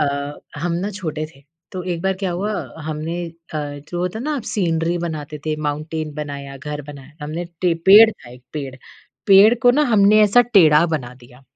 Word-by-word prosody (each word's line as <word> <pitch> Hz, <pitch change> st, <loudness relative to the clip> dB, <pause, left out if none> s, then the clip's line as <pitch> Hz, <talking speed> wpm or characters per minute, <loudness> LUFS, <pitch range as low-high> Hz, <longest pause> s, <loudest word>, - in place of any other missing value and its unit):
अ, 140 Hz, 0 st, -2 dB, 0.2 s
हम 175 Hz, 0 st, -1 dB
ना 190 Hz, +5 st, -2 dB
छोटे 160 Hz, -6 st, -4 dB
थे, 135 Hz, -, -20 dB, 0.3 s
तो 185 Hz, -1 st, -5 dB
एक 170 Hz, -, -4 dB
बार 190 Hz, 0 st, +1 dB
क्या 185 Hz, -, 0 dB
हुआ 200 Hz, +5 st, -2 dB, 0.3 s
हमने 160 Hz, +3 st, -4 dB
अ, -, -, -8 dB, 0.6 s
जो 175 Hz, -, -5 dB
होता 180 Hz, +4 st, -2 dB
है -, -, -5 dB
ना 300 Hz, -1 st, -1 dB
सीनरी 170 Hz, -3 st, 0 dB
बनाते 155 Hz, -3 st, -5 dB
थे, 155 Hz, -, 0 dB
माउंटेन 155 Hz, +1 st, -4 dB
बनाया, 140 Hz, -2 st, -6 dB
घर 150 Hz, +2 st, -6 dB
बनाया। 145 Hz, 0 st, -12 dB
हमने 160 Hz, +4 st, -4 dB, 0.2 s
टे 175 Hz, -2 st, +2 dB
पेड़ 215 Hz, +3 st, +9 dB
था 125 Hz, -, -14 dB
एक 125 Hz, 0 st, -14 dB
पेड़, 140 Hz, -4 st, -5 dB, 0.5 s
पेड़ 200 Hz, +4 st, +7 dB
को 245 Hz, -, +7 dB
ना 285 Hz, +5 st, +3 dB
हमने 210 Hz, +1 st, +5 dB
ऐसा 210 Hz, +4 st, +5 dB
टेढ़ा 160 Hz, -4 st, +6 dB
बना 125 Hz, -3 st, -9 dB
दिया। 125 Hz, +2 st, -18 dB
165 Hz, 190 wpm, -20 LUFS, 145-190 Hz, 0.6 s, पेड़